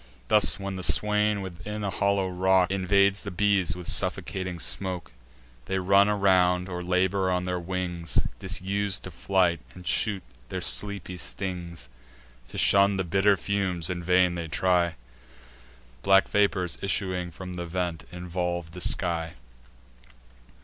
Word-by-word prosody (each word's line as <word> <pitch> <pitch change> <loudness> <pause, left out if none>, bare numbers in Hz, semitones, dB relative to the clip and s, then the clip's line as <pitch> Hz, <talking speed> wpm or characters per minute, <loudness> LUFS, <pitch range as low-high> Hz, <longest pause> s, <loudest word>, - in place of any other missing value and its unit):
Thus, 105 -1 +4
when 100 -1 -5
the - - -5
swain, 105 +1 +2
within 95 +3 -6
a 100 - -2
hollow 100 -1 +1
rock, 95 0 +2
Invades 100 +1 +2
the 100 - -6
bees 100 -1 +1
with 90 -2 -7
suffocating 90 -2 0
smoke, 90 0 -4 0.5
They 95 - -2
run 100 +2 +4
around, 90 -3 +3
or 90 -1 -5
labour 95 +1 +1
on 90 0 0
their 90 -1 -2
wings, 90 -3 -3 0.2
Disus'd 95 +1 -2
to 95 - -7
flight, 85 0 +1 0.2
and 90 - -12
shoot 100 -2 0 0.3
their - - -3
sleepy 100 -3 +1
stings; 90 -7 -5 0.6
To - - -10
shun 100 0 +4
the 95 - 0
bitter 95 +3 +2
fumes 95 -2 -2
in 90 -1 -4
vain 90 0 +3
they 85 -1 -4
try; 85 0 +1 1.1
Black 95 0 +4
vapours, 100 -4 +1
issuing 95 -2 -1
from 90 +2 -9
the 85 -1 -5
vent, 90 -1 -3
involve 90 -1 -4
the 90 +2 -9
sky. 85 -3 +1
95 Hz, 140 wpm, -26 LUFS, 90-100 Hz, 1.1 s, Thus